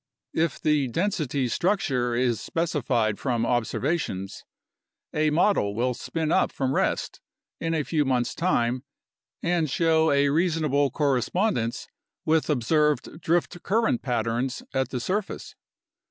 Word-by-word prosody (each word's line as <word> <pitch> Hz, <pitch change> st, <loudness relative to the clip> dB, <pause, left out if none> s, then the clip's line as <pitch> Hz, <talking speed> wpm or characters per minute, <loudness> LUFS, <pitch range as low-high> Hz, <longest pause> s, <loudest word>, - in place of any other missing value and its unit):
If 160 Hz, -2 st, 0 dB
the 150 Hz, -3 st, +2 dB
density 150 Hz, -, -1 dB
structure 130 Hz, -, 0 dB
is 120 Hz, -2 st, +1 dB
specified 125 Hz, -10 st, 0 dB
from 120 Hz, -4 st, 0 dB
observations, 120 Hz, -, -1 dB, 0.7 s
a 155 Hz, 0 st, +2 dB
model 150 Hz, -, +2 dB
will 125 Hz, +3 st, +1 dB
spin 160 Hz, +5 st, -3 dB
up -, -, +3 dB
from 135 Hz, -1 st, -1 dB
rest -, -, -1 dB, 0.4 s
in 165 Hz, 0 st, -1 dB
a 155 Hz, -, 0 dB
few 150 Hz, +3 st, +1 dB
months' 125 Hz, -3 st, 0 dB
time 125 Hz, -8 st, 0 dB, 0.6 s
and 170 Hz, -3 st, +1 dB
show 160 Hz, +2 st, +3 dB
a 140 Hz, 0 st, +3 dB
reasonable 155 Hz, -3 st, +2 dB
correspondence 140 Hz, -, 0 dB, 0.4 s
with 160 Hz, 0 st, +2 dB
observed 150 Hz, +3 st, +1 dB
drift 175 Hz, +1 st, 0 dB
current 220 Hz, -, +1 dB
patterns 120 Hz, +1 st, -1 dB
at 130 Hz, -2 st, 0 dB
the 130 Hz, -, -3 dB
surface. 195 Hz, -, -3 dB
145 Hz, 125 wpm, -26 LUFS, 125-165 Hz, 0.7 s, up